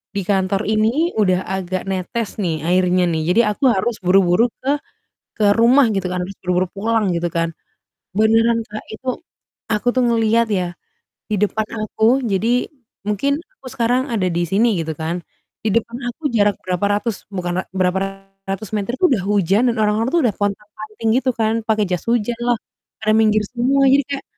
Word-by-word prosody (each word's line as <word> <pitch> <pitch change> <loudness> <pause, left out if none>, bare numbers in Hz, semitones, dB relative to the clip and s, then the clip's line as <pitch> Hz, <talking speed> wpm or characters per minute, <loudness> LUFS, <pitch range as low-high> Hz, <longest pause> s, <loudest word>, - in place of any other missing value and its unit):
di 200 - 0
kantor 195 0 +1
ini 240 +11 +1
udah 185 -3 +3
agak 185 -1 -3
netes 195 +4 -2
nih 170 -4 0
airnya 180 0 +3
nih, 160 - 0
jadi 210 +6 +5
aku 275 - -10
harus 215 +4 0
buru-buru 180 +2 +4 0.2
ke 260 - -8 0.7
ke 215 - +2 0.2
rumah," 250 +3 +6
gitu 195 -2 -1
kan, 180 - -2
"harus 195 - -9
buru-buru 180 0 +1
pulang" 220 +2 0
gitu 170 0 -1
kan. 165 0 0 0.7
Beneran 225 +2 +4
Kak 215 0 -7
itu, 260 +4 -11 0.7
aku 210 +3 -2
tuh 255 - +3
ngelihat 230 0 +2
ya, 185 -4 0 0.6
di - - +1
depan 210 +1 0 0.2
aku. 230 +6 +2
Jadi 225 +4 +1 0.4
mungkin 210 +7 0 0.2
aku 275 - -18
sekarang 255 +2 0
ada 200 -5 0
di 170 0 0
sini 220 +5 +3
gitu 160 0 -4
kan, 165 +2 -3 0.4
di 220 - +2
depan 230 0 0 0.2
aku 245 - -17
jarak 205 -2 +3
berapa 185 +1 0
ratus 230 +1 -2 0.2
bukan 180 -3 -3
ra - - -18
berapa 185 0 +1 0.5
ratus 195 +1 -4
meter, 210 +2 -1
itu 370 - +5
udah 230 -8 +1
hujan 200 +1 +2
dan 235 - -3
orang-orang 215 +2 +1
tuh 340 - +4
udah 215 - 0
pontang-panting 210 +2 -4
gitu 260 - +1
kan, 220 0 +1
pakai 215 -1 +2
jas 180 -2 -1
hujan 235 0 +1
lah, 240 -1 +1 0.4
pada 215 0 +1
minggir 215 -1 +3
semua 260 +4 +2
jadi 275 +2 +5
kayak 280 -1 -3
210 Hz, 175 wpm, -19 LUFS, 190-230 Hz, 0.7 s, rumah